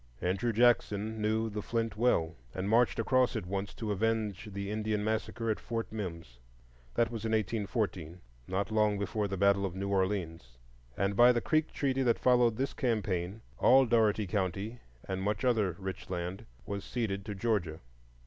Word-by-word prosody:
Andrew 100 +7 0
Jackson 110 -2 +2
knew 110 +1 +1
the 105 -1 -4
Flint 115 0 -2
well, 105 -8 +2 0.2
and 95 +1 -2
marched 115 +3 +3
across 125 +2 +2
it - - -2
once 100 +2 -3
to 110 -2 -3
avenge 110 -1 -1
the 100 +1 -4
Indian 105 -1 -1
Massacre 110 +1 -1
at 110 - -2
Fort 115 -1 -4
Mims. 85 - -6 0.6
That 115 +6 +2
was 115 -2 -5
in 110 0 -1
1814, 100 -5 -1 0.3
not 95 +3 -2
long 105 -1 +2
before 100 +1 -1
the 95 0 -4
battle 100 +1 +3
of 95 -2 -3
New 100 +1 -3
Orleans; 90 -10 -1 0.4
and 100 +1 0
by 120 +3 +7
the 120 - +1
Creek 155 +5 +1
treaty 135 -2 0
that 120 -3 +3
followed 120 -3 +3
this 135 +1 -1
campaign, 105 -4 -1 0.2
all 130 +1 +6
Dougherty 110 -3 +3
County, 100 +4 -2 0.3
and 95 0 -2
much 105 +6 -1
other 110 -8 +2
rich 95 -2 -6
land, 90 +4 -4 0.2
was 100 -2 -4
ceded 100 -5 -2
to 105 - -5
Georgia. 95 -7 -1
105 Hz, 170 wpm, -31 LUFS, 95-115 Hz, 0.6 s, by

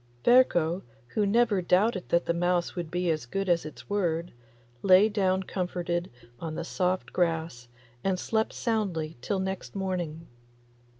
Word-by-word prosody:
Ferko, 185 -9 +4 0.3
who 210 - +1
never 220 -2 +3
doubted 185 +2 +2
that 170 - +2
the 170 - +1
mouse 175 0 0
would 175 -3 -4
be 175 0 0
as 155 -6 -3
good 195 +8 -2
as 170 -2 +2
its 155 - -12
word, 175 -4 -1 0.5
lay 190 +2 +6
down 190 -3 +1
comforted 175 -2 -2 0.3
on 160 -2 -5
the 170 - -3
soft 185 +2 -1
grass 165 -8 -1 0.4
and 190 -1 +1
slept 220 +2 0
soundly 185 -9 -2
till 195 - -1
next 190 +1 -4
morning. 175 -5 -3
180 Hz, 145 wpm, -28 LUFS, 170-195 Hz, 0.5 s, lay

